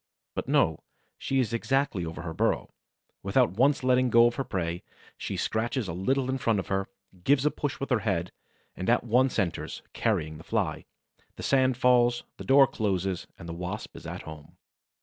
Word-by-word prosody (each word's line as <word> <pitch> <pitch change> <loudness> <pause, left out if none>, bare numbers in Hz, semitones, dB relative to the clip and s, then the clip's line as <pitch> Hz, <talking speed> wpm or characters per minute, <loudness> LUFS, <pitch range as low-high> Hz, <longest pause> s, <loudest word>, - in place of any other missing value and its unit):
But - - -4
no; 80 -1 +3 0.4
she 135 - 0
is 115 -4 0
exactly 115 -6 0
over 80 +1 -6
her 80 -2 -5
burrow. - - 0 0.5
Without - - +2
once 135 +8 +2
letting 130 0 +3
go 115 +1 +6
her 135 - -3
prey, 90 -7 -3 0.3
she - - -4
scratches 115 +1 -1
a 85 - -4
little 130 +9 0
in 130 0 -1
front 115 -3 +1
of 95 - -4
her, 95 0 -1 0.3
gives 140 +3 +3
a 150 - +4
push 145 -2 -3
with 140 - -4
her 120 - +4
head, 95 -5 -1 0.4
and 95 - -3
at 120 - +3
once 125 +3 +2
enters, 95 -6 -2
carrying 80 0 -1
the - - -11
Fly. 90 -8 -1 0.5
The - - -8
sand 130 -2 +3
falls 120 -1 +4
in, - - -28
the - - -8
door 135 +1 +7
closes, 95 -6 -2
and 85 - -10
the 85 - -5
Wasp 90 +1 -6
is - - -9
at - - -6
home. 75 -1 -11
115 Hz, 190 wpm, -28 LUFS, 90-130 Hz, 0.5 s, door